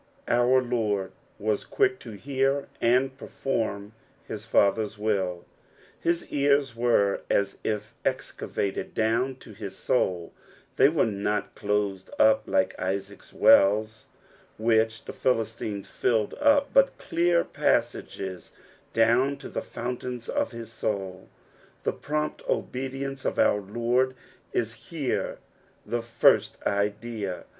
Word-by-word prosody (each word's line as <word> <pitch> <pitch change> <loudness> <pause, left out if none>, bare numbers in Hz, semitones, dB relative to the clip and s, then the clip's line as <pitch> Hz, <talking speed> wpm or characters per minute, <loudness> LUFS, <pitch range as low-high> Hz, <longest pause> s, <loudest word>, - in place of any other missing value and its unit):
''^ - - -35 0.3
Our 125 +2 +4
Lord 105 -6 -1 0.3
was 105 -1 -1
quick 395 -1 +1
to - - -9
hear 135 +5 0
and 130 +3 +3
perform 110 -8 -3 0.3
hia - - -5
Father's 105 +1 +2
will; 95 -5 -1 0.5
his 170 0 0
ears 140 -3 +2
were 115 -4 +2
as 100 -1 +1
if 105 -1 -3
excavated 100 - -3
down 115 +4 +1
to 120 -4 -14
hia 100 -1 -6
soul; 95 -3 -1 0.4
they 135 - +7
were 155 -1 +2
not 105 -1 -2
closed 100 -2 -1
up 110 0 +5
like 95 0 +2
Isaac's 100 +1 -4
wells, 110 +2 +4 0.5
which 110 0 +2
the - - -6
Philistines 110 -4 -1
filled 110 -4 0
up, 285 -1 +4
but 275 0 +4
clear 170 0 +2
passaKea 95 -2 -1 0.4
down 120 +5 +3
to - - -9
the - - -3
fountains 125 0 -5
of - - -1
his 115 -2 -8
soul. 95 -4 -4 0.5
The - - 0
prompt 150 +1 -3
obedience 135 +1 -3
of - - -1
our 105 - +3
Lord 120 +5 0 0.4
is 115 -1 -3
here 155 -6 -2 0.5
the 120 0 -1
first 115 0 +3
idea. 105 -1 -2
115 Hz, 120 wpm, -27 LUFS, 100-130 Hz, 0.5 s, they